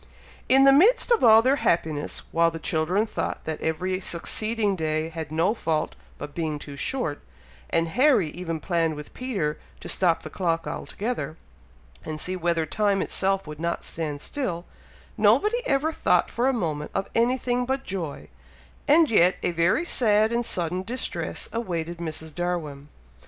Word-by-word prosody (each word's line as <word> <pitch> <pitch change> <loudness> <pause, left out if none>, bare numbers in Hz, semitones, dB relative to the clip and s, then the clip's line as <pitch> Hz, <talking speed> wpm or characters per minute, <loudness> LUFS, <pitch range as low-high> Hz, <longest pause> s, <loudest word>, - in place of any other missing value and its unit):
In 270 +1 +6
the 275 - +8
midst 395 - +5
of 470 - +4
all 225 -1 +8
their 265 +3 +3
happiness, 155 - -1
while 165 0 +4
the 165 - -6
children 165 +6 0
thought - - -4
that 160 -1 -4
every 185 +4 -1
succeeding 210 +4 -1
day 155 -1 -1
had 160 -2 -6
no 165 +6 +2
fault 160 -8 -1 0.2
but 145 - -7
being 160 -3 -2
too 145 -1 -9
short, 150 - -2 0.5
and 165 0 +1
Harry 250 - +3
even 165 -1 -4
planned 165 -1 0
with 150 0 -9
Peter 195 -13 -2 0.2
to - - -9
stop 175 -3 +2
the - - -8
clock 165 -3 -1
altogether, 215 -7 -4 0.7
and 155 -1 -5
see 185 +4 -2
whether 170 -2 0
time 200 +4 +1
itself 195 0 -1
would 150 0 -8
not 170 +1 -2
stand 150 -3 -5
still, 180 - -3 0.5
nobody 460 +4 +3
ever 280 +4 +2
thought 180 - +2
for 245 +3 +1
a - - +4
moment 155 - -2
of 195 - -1
anything 245 +1 +1
but 265 +1 -1
joy; 175 - -5 0.6
and 310 0 +5
yet 180 -3 +5
a - - +1
very 170 - +2
sad 220 -6 +2
and 235 0 0
sudden 175 +1 -2
distress 235 +7 -4
awaited 175 -7 -3
Mrs. 160 -1 -5
Darwin. 155 -5 -3
180 Hz, 160 wpm, -25 LUFS, 160-230 Hz, 0.7 s, the